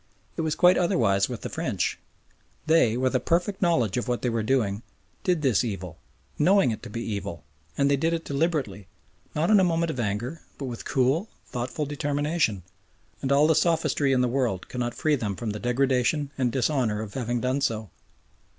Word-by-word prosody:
It -, -, -2 dB
was 155 Hz, -1 st, -1 dB
quite 180 Hz, 0 st, +5 dB
otherwise 110 Hz, -, +2 dB
with 120 Hz, -3 st, -5 dB
the -, -, -4 dB
French. -, -, -2 dB, 0.7 s
They, 155 Hz, -8 st, +4 dB
with 130 Hz, +1 st, +1 dB
a -, -, +4 dB
perfect 175 Hz, -, 0 dB
knowledge 125 Hz, -, +2 dB
of 120 Hz, -, -2 dB
what 125 Hz, -1 st, -1 dB
they 125 Hz, -, +1 dB
were 115 Hz, -1 st, 0 dB
doing, 110 Hz, -3 st, 0 dB, 0.4 s
did 175 Hz, -4 st, +1 dB
this 130 Hz, -6 st, +3 dB
evil, 95 Hz, -7 st, -5 dB, 0.4 s
knowing 185 Hz, -2 st, +4 dB
it 110 Hz, -, -5 dB
to -, -, -9 dB
be 115 Hz, +3 st, -4 dB
evil, 100 Hz, -7 st, -5 dB, 0.3 s
and 140 Hz, -, +3 dB
they 140 Hz, 0 st, +3 dB
did 160 Hz, +4 st, +1 dB
it 165 Hz, -1 st, -2 dB
deliberately, 140 Hz, -, -1 dB, 0.5 s
not 165 Hz, +6 st, +1 dB
in 210 Hz, -, +7 dB
a -, -, +4 dB
moment 165 Hz, -2 st, +1 dB
of 130 Hz, -, -6 dB
anger 120 Hz, +8 st, -2 dB, 0.2 s
but 140 Hz, -, -5 dB
with 120 Hz, -3 st, -6 dB
cool, 135 Hz, -, +1 dB, 0.2 s
thoughtful 125 Hz, +5 st, -3 dB
determination, 145 Hz, -, -1 dB, 0.6 s
and 135 Hz, -, -1 dB
all 140 Hz, +2 st, +5 dB
the 160 Hz, -, +4 dB
sophistry 155 Hz, -4 st, +2 dB
in 130 Hz, -1 st, +3 dB
the 125 Hz, -, +2 dB
world 120 Hz, -7 st, -1 dB
cannot 120 Hz, -1 st, -3 dB
free 155 Hz, -1 st, +2 dB
them 105 Hz, -7 st, -3 dB
from 115 Hz, 0 st, -3 dB
the 105 Hz, -, -5 dB
degradation 135 Hz, +4 st, +1 dB
and 125 Hz, -3 st, 0 dB
dishonour 125 Hz, -5 st, 0 dB
of 100 Hz, -, -9 dB
having 120 Hz, -2 st, -2 dB
done 130 Hz, +3 st, 0 dB
so. 110 Hz, -, -2 dB
130 Hz, 195 wpm, -26 LUFS, 115-155 Hz, 0.7 s, in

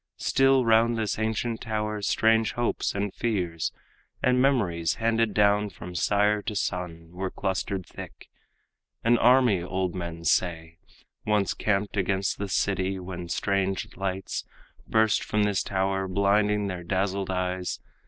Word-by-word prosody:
Still 135 Hz, -1 st, +3 dB
round 115 Hz, +1 st, +4 dB
this 110 Hz, -1 st, -1 dB
ancient 110 Hz, +1 st, -1 dB
tower, 105 Hz, -2 st, -2 dB
strange 110 Hz, +2 st, +2 dB
hopes 120 Hz, -4 st, -1 dB
and 100 Hz, -1 st, -2 dB
fears, 90 Hz, -8 st, -1 dB, 0.5 s
And 125 Hz, 0 st, +3 dB
memories 95 Hz, -12 st, +1 dB
handed 115 Hz, -1 st, +1 dB
down 105 Hz, 0 st, +3 dB
from 90 Hz, -1 st, -9 dB
sire 105 Hz, +4 st, +2 dB
to 105 Hz, -, -4 dB
son, 85 Hz, -4 st, -3 dB
Were 95 Hz, +2 st, -3 dB
clustered 95 Hz, -1 st, -2 dB
thick. -, -, -11 dB, 0.7 s
An 120 Hz, +1 st, +4 dB
army, 125 Hz, -6 st, +5 dB
old 90 Hz, 0 st, -2 dB
men 85 Hz, -2 st, -6 dB
say, 85 Hz, -2 st, 0 dB, 0.4 s
Once 105 Hz, -2 st, +1 dB
camped 105 Hz, 0 st, -1 dB
against 95 Hz, 0 st, 0 dB
the 100 Hz, -1 st, -3 dB
city, 95 Hz, 0 st, 0 dB
when 90 Hz, -2 st, -7 dB
strange 95 Hz, 0 st, -1 dB
lights 95 Hz, 0 st, -3 dB, 0.4 s
Burst 110 Hz, -1 st, +2 dB
from 105 Hz, 0 st, 0 dB
this 105 Hz, -2 st, +1 dB
tower, 95 Hz, 0 st, -1 dB
blinding 100 Hz, +2 st, +2 dB
their 90 Hz, -3 st, -4 dB
dazzled 95 Hz, +2 st, -1 dB
eyes. 90 Hz, -1 st, -2 dB
100 Hz, 135 wpm, -26 LUFS, 95-110 Hz, 0.7 s, army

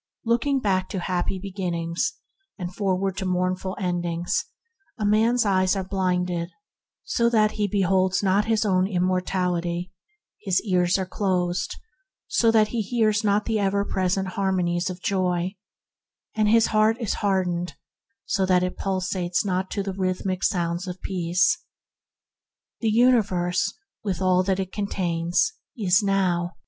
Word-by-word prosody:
Looking 240 Hz, +4 st, +2 dB
back 190 Hz, -5 st, 0 dB
to 190 Hz, -, -3 dB
happy 180 Hz, +1 st, -1 dB
beginnings, 180 Hz, 0 st, -2 dB, 0.4 s
and 180 Hz, -2 st, -5 dB
forward 195 Hz, -1 st, -1 dB
to 190 Hz, -, -2 dB
mournful 185 Hz, +1 st, -1 dB
endings, 175 Hz, -2 st, -1 dB, 0.5 s
a 215 Hz, -, -2 dB
man's 225 Hz, +3 st, +3 dB
eyes 185 Hz, -1 st, +2 dB
are 195 Hz, -, -1 dB
blinded 180 Hz, -2 st, -1 dB, 0.5 s
so 235 Hz, -1 st, +1 dB
that 215 Hz, -2 st, +3 dB
he 210 Hz, -1 st, -1 dB
beholds 190 Hz, -1 st, +1 dB
not 195 Hz, +2 st, +3 dB
his 220 Hz, -1 st, +1 dB
own 185 Hz, -2 st, +2 dB
immortality; 180 Hz, -1 st, -1 dB, 0.5 s
his 190 Hz, -4 st, +1 dB
ears 180 Hz, -3 st, +2 dB
are 190 Hz, -, -2 dB
closed 180 Hz, -2 st, -1 dB, 0.5 s
so 230 Hz, -, +3 dB
that 220 Hz, -1 st, +4 dB
he 235 Hz, -, -1 dB
hears 220 Hz, 0 st, +1 dB
not 205 Hz, 0 st, +2 dB
the 220 Hz, -2 st, 0 dB
ever 200 Hz, 0 st, +1 dB
present 190 Hz, 0 st, 0 dB
harmonies 185 Hz, -2 st, 0 dB
of 185 Hz, 0 st, -8 dB
Joy; 185 Hz, -1 st, 0 dB, 0.8 s
and 215 Hz, -1 st, +2 dB
his 225 Hz, +1 st, +4 dB
heart 215 Hz, +1 st, +4 dB
is 225 Hz, -5 st, -1 dB
hardened 180 Hz, -5 st, 0 dB, 0.5 s
so 195 Hz, -, 0 dB
that 180 Hz, -1 st, +3 dB
it 180 Hz, -, -3 dB
pulsates 185 Hz, -1 st, -1 dB
not 185 Hz, -1 st, -1 dB
to 200 Hz, -, -2 dB
the 195 Hz, -1 st, -4 dB
rhythmic 185 Hz, 0 st, -2 dB
sounds 175 Hz, +1 st, 0 dB
of 180 Hz, 0 st, -6 dB
Peace. 185 Hz, -, +1 dB, 1.2 s
The 225 Hz, -, 0 dB
universe, 205 Hz, -6 st, +2 dB, 0.3 s
with 195 Hz, -5 st, -2 dB
all 185 Hz, -1 st, +3 dB
that 190 Hz, 0 st, 0 dB
it 190 Hz, -1 st, -3 dB
contains, 180 Hz, -, 0 dB, 0.2 s
is 190 Hz, -2 st, +3 dB
now. 185 Hz, -3 st, 0 dB
190 Hz, 140 wpm, -24 LUFS, 180-205 Hz, 1.2 s, that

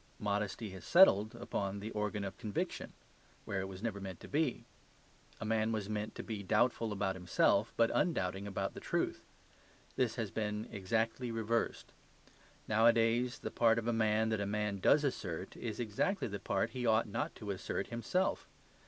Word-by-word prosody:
Modesty 105 Hz, +1 st, -2 dB
has 95 Hz, -2 st, -9 dB
settled 110 Hz, -, +6 dB
upon 100 Hz, 0 st, -3 dB
the 105 Hz, +3 st, -5 dB
organ 105 Hz, -1 st, -2 dB
of 95 Hz, -, -4 dB
conviction; 105 Hz, -2 st, -3 dB, 0.5 s
where 95 Hz, -, -2 dB
it 95 Hz, -, -4 dB
was 95 Hz, +1 st, -9 dB
never 105 Hz, -4 st, -2 dB
meant 95 Hz, -3 st, -6 dB
to -, -, -9 dB
be. 145 Hz, -3 st, 0 dB, 0.7 s
A -, -, -4 dB
man 110 Hz, 0 st, +1 dB
was 105 Hz, -3 st, -2 dB
meant 105 Hz, 0 st, -3 dB
to -, -, -5 dB
be 110 Hz, -3 st, -4 dB
doubtful 115 Hz, +3 st, +2 dB
about 100 Hz, -2 st, -1 dB
himself, 95 Hz, +4 st, +2 dB
but 115 Hz, -1 st, +4 dB
undoubting 95 Hz, -, 0 dB
about 100 Hz, -, -2 dB
the -, -, -7 dB
truth; -, -, -1 dB, 0.8 s
this -, -, +1 dB
has -, -, -3 dB
been 105 Hz, -1 st, -2 dB
exactly 115 Hz, +4 st, -1 dB
reversed. 115 Hz, 0 st, -1 dB, 0.8 s
Nowadays 115 Hz, +2 st, +3 dB
the -, -, -5 dB
part 115 Hz, -1 st, +4 dB
of 115 Hz, -, -1 dB
a 120 Hz, -, +2 dB
man 110 Hz, 0 st, +2 dB
that 110 Hz, -2 st, 0 dB
a 100 Hz, -, -1 dB
man 105 Hz, -1 st, -1 dB
does 145 Hz, +10 st, +5 dB
assert 95 Hz, -, -3 dB
is 110 Hz, -1 st, -5 dB
exactly 120 Hz, -, 0 dB
the 100 Hz, -2 st, -5 dB
part -, -, 0 dB
he 125 Hz, -1 st, -4 dB
ought 110 Hz, -1 st, +3 dB
not 110 Hz, +2 st, -3 dB
to 105 Hz, -2 st, -5 dB
assert 95 Hz, 0 st, -3 dB
himself. 180 Hz, +11 st, 0 dB
110 Hz, 175 wpm, -34 LUFS, 100-115 Hz, 0.8 s, settled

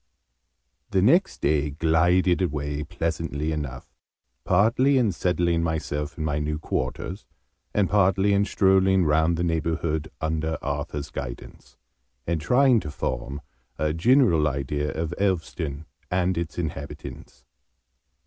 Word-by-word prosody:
The -, -, +2 dB
next -, -, +3 dB
day 75 Hz, 0 st, +2 dB
glided 85 Hz, +4 st, +2 dB
away, 75 Hz, -3 st, -2 dB
pleasantly 80 Hz, 0 st, -3 dB
enough, 70 Hz, -5 st, -4 dB, 0.6 s
partly 115 Hz, -, +3 dB
in 120 Hz, -5 st, +3 dB
settling 85 Hz, -2 st, 0 dB
myself 75 Hz, -2 st, -3 dB
in 80 Hz, -, -3 dB
my 75 Hz, -1 st, 0 dB
new 75 Hz, +1 st, -2 dB
quarters, 80 Hz, +6 st, -4 dB, 0.4 s
and 100 Hz, -2 st, +2 dB
partly 100 Hz, 0 st, +3 dB
in 100 Hz, 0 st, +3 dB
strolling 95 Hz, -2 st, +3 dB
round 80 Hz, +2 st, +2 dB
the 85 Hz, -, -1 dB
neighbourhood, 80 Hz, -2 st, -1 dB
under 80 Hz, -1 st, -1 dB
Arthur's 70 Hz, 0 st, -4 dB
guidance, -, -, -8 dB, 0.5 s
and 85 Hz, -2 st, -1 dB
trying 125 Hz, -, +4 dB
to 75 Hz, -, -6 dB
form 70 Hz, 0 st, -4 dB, 0.4 s
a 75 Hz, +1 st, 0 dB
general 90 Hz, -, +4 dB
idea 75 Hz, +1 st, -2 dB
of 80 Hz, +1 st, -3 dB
Elveston 80 Hz, -6 st, -2 dB, 0.2 s
and 90 Hz, 0 st, +1 dB
its 85 Hz, -1 st, -4 dB
inhabitants. 75 Hz, -5 st, -7 dB
80 Hz, 120 wpm, -25 LUFS, 75-90 Hz, 0.6 s, trying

